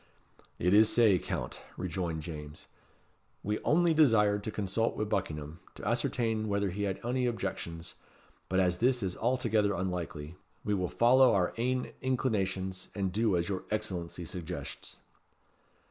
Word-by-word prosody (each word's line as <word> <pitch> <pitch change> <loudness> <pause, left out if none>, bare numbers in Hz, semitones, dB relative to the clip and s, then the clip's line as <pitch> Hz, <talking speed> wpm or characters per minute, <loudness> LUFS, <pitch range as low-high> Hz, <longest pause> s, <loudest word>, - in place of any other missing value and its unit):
"It 90 +3 +2
is 110 +1 +6
sae, 110 -6 +5
Count," - - -4 0.2
rejoined 85 -3 -3
James. 75 -2 -8 0.8
"We 105 +1 -1
only 170 +2 +3
desired 105 -9 +4
to - - -1
consult 105 +2 -1
wi' - - 0
Buckingham 80 -6 -3 0.2
to - - -7
ascertain 115 -1 0
whether 100 -2 0
he 100 +3 -2
had 95 -2 -2
ony 125 +1 0
objections; 85 -7 -4 0.6
but 95 - +2
as 90 -1 +2
this 125 -1 +2
is 90 -2 -2
altogether 110 -4 +1
unlikely, 85 -4 -4 0.3
we 105 - +1
will 90 -3 0
follow 125 +1 +5
our 90 -2 +1
ain 125 +2 -1
inclinations 95 -8 -1
and 95 -2 -1
do 105 -1 +2
as 85 0 -1
your 95 -2 -3
Excellency 90 -5 -3
suggests." 85 -3 -7
100 Hz, 145 wpm, -31 LUFS, 90-115 Hz, 0.8 s, is